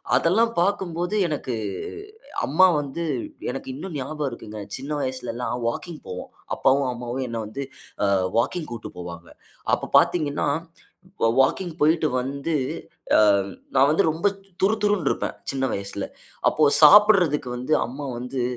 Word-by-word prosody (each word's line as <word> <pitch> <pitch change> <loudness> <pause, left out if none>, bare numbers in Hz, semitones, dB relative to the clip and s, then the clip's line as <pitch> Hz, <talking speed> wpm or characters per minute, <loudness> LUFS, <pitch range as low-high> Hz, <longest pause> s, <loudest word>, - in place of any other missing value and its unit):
அதெல்லாம் 195 - +3
பாக்கும்போது, 180 -1 -1
எனக்கு 140 -6 -3 0.9
அம்மா 180 +7 +5
வந்து, 145 +3 -4 0.5
எனக்கு 135 - -7
இன்னும் 160 +3 -7
ஞாபகம் 150 +2 -3
இருக்குங்க. 110 -3 -8 0.2
சின்ன 135 +3 -7
வயசுல 130 -2 -3
எல்லாம் 125 0 -3
வாக்கிங் 160 +7 -4
போவோம். 90 - -7 0.3
அப்பாவும் 135 0 +3
அம்மாவும் 125 +2 -4
என்ன 115 -1 -4
வந்து, 135 +6 -5 0.4
ஆ - - +2 0.3
வாக்கிங் 160 +7 -1
கூட்டு 115 -2 -7
போவாங்க. 85 -1 -8 0.4
அப்ப - - -1
பார்த்தீங்கனா, 150 -4 0 0.8
வா - - +6
வாக்கிங் 170 +5 0
போய்ட்டு 155 -1 +3
வந்து, 140 +5 -2 0.6
ஆ - - +6 0.6
நான் 135 +2 +6
வந்து 165 +6 +3
ரொம்ப 165 +6 0 0.4
துறு 215 +3 +3
துறுன்டு 205 -4 +2
இருப்பேன். - - -3 0.2
சின்ன 135 -1 -1
வயசுல. 100 0 -4 0.4
அப்போ 155 - +2 0.2
சாப்பிட்றதுக்கு 180 -8 +6
வந்து 155 +5 +1
அம்மா 140 +3 -6
வந்து 125 +1 -4
140 Hz, 135 wpm, -24 LUFS, 125-170 Hz, 0.9 s, வா